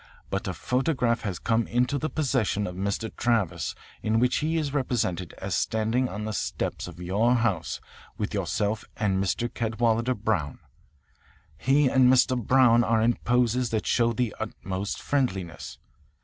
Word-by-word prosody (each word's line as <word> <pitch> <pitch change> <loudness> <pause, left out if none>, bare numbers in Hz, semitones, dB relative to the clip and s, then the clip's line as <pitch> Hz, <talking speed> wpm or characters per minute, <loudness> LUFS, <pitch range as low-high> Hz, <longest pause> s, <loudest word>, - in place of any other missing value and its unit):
But 100 +1 -2
a 90 - -2
photograph 125 - 0
has 95 -5 -3
come 115 0 0
into 125 +4 +1
the 155 - -2
possession 125 -8 0
of 90 - -4
Mr. 100 +4 -3
Travis 95 - 0 0.3
in 110 +1 +1
which 125 +1 +2
he 160 +2 0
is 145 -3 -2
represented 105 - -1
as - - -5
standing 115 +3 0
on 105 +1 -5
the 110 - -3
steps - - -3
of 85 0 -10
your 105 +8 +2
house 115 -8 0 0.4
with - - -3
yourself 105 +1 -1
and 95 -2 +1
Mr. 110 +5 0
Cadwalader 115 +1 0
Brown. 100 - -1 1.0
He 140 +2 +3
and 130 -1 +5
Mr. 130 0 +4
Brown 120 0 +4
are 115 -1 +2
in 120 +1 +4
poses 125 0 +1
that 110 -1 -1
show 115 -1 +2
the 115 -1 -1
utmost 100 -2 -4
friendliness. 95 -12 -2
115 Hz, 155 wpm, -26 LUFS, 100-125 Hz, 1.0 s, and